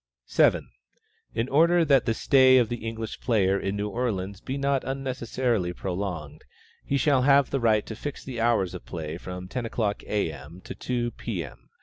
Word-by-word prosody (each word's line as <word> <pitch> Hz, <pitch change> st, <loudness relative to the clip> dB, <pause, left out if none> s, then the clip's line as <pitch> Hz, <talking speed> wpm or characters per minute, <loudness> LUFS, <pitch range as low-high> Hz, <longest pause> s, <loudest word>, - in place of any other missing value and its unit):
7. -, -, +3 dB, 0.7 s
In 115 Hz, +2 st, 0 dB
order 165 Hz, +4 st, +4 dB
that 140 Hz, -4 st, +4 dB
the 115 Hz, -, +1 dB
stay 130 Hz, 0 st, +5 dB
of 120 Hz, -3 st, +3 dB
the 120 Hz, -2 st, -5 dB
English 115 Hz, 0 st, -5 dB
player 100 Hz, -5 st, +2 dB
in 95 Hz, +1 st, -2 dB
New 105 Hz, 0 st, -2 dB
Orleans 100 Hz, -4 st, -3 dB
be 135 Hz, +1 st, -4 dB
not 140 Hz, -1 st, +1 dB
unnecessarily 125 Hz, -7 st, -1 dB
prolonged, 90 Hz, -5 st, -5 dB, 0.4 s
he 140 Hz, -, 0 dB
shall 140 Hz, -1 st, +3 dB
have 140 Hz, +1 st, +4 dB
the 135 Hz, -, 0 dB
right 110 Hz, -3 st, +2 dB
to 110 Hz, -, -7 dB
fix 145 Hz, +5 st, -6 dB
the 125 Hz, -4 st, -5 dB
hours 115 Hz, -6 st, +2 dB
of -, -, -7 dB
play 75 Hz, +5 st, -6 dB
at 85 Hz, -, -8 dB
from 90 Hz, 0 st, -7 dB
ten 125 Hz, +6 st, -4 dB
o'clock, 110 Hz, -3 st, -2 dB
A. 105 Hz, -6 st, 0 dB
M., 75 Hz, +5 st, -11 dB
to -, -, -8 dB
two, 120 Hz, -1 st, -2 dB
P. 105 Hz, -6 st, -4 dB
M. -, -, -13 dB
115 Hz, 195 wpm, -26 LUFS, 95-130 Hz, 0.7 s, stay